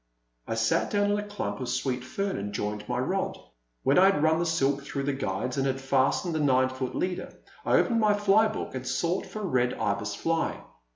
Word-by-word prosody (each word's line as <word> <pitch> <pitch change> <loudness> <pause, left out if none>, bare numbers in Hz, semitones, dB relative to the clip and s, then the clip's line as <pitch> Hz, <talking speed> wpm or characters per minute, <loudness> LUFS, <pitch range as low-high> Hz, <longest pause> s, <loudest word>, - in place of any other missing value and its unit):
I - - -2
sat 115 0 +1
down 205 0 +2
in 205 - +1
a 205 - -5
clump 105 - -4
of 125 - -4
sweet 130 0 -1
fern 195 +9 -2
and 100 +1 -4
joined 105 +1 -4
my 125 - 0
rod. 185 +10 -1 0.5
When 140 +6 +4
I 190 - +7
had 195 -6 +3
run 160 +1 +3
the 175 - 0
silk 140 -4 +1
through 140 0 -4
the 140 0 0
guides 125 0 -3
and 135 0 +1
had 135 0 -1
fastened 135 +6 +1
the 160 - -1
nine 130 -3 +3
foot 130 -1 -4
leader, 180 0 -2 0.3
I - - +2
opened 235 -2 +3
my 210 -2 +4
fly 205 +2 +4
book 215 - -5
and 130 -1 -5
sought 170 +8 -1
for 215 - -7
a - - -2
Red 125 -7 +1
Ibis 100 0 -1
fly. 165 0 -1
135 Hz, 225 wpm, -27 LUFS, 125-190 Hz, 0.5 s, I